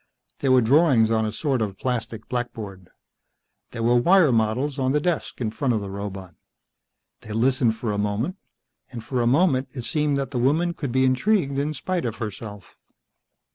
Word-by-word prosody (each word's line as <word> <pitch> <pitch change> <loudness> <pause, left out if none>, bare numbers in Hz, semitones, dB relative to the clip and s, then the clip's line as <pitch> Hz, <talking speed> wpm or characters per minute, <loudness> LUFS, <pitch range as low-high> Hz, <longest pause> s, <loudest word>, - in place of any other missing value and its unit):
There 135 - +1
were 130 -1 +6
drawings 130 -3 +4
on 110 -1 +1
a - - -3
sort 130 +2 -1
of 100 -3 -3
plastic 115 -2 -3
blackboard. 110 -7 -5 0.8
There 115 - -5
were 120 +1 +3
wire 170 +3 +5
models 120 +6 0
on 130 0 +1
the 150 - +3
desk 170 +1 -2
in 110 -4 -2
front 125 0 0
of - - 0
the 100 -1 -6
robot. 95 -3 -6 0.9
They 110 - -9
listened 120 0 +2
for 115 -1 -3
a 100 - -2
moment, 105 - -2 0.5
and 120 -3 -7
for 125 -1 -2
a 120 - +1
moment 135 -1 +3
it 125 - -6
seemed 150 0 0
that 135 -1 -3
the 125 - -2
woman 160 +8 +2
could 140 -6 -4
be 130 +1 +3
intrigued 140 +1 +1
in 150 +2 -2
spite 180 +3 -2
of 115 -2 -2
herself. 105 -3 -8
125 Hz, 185 wpm, -24 LUFS, 110-140 Hz, 0.9 s, were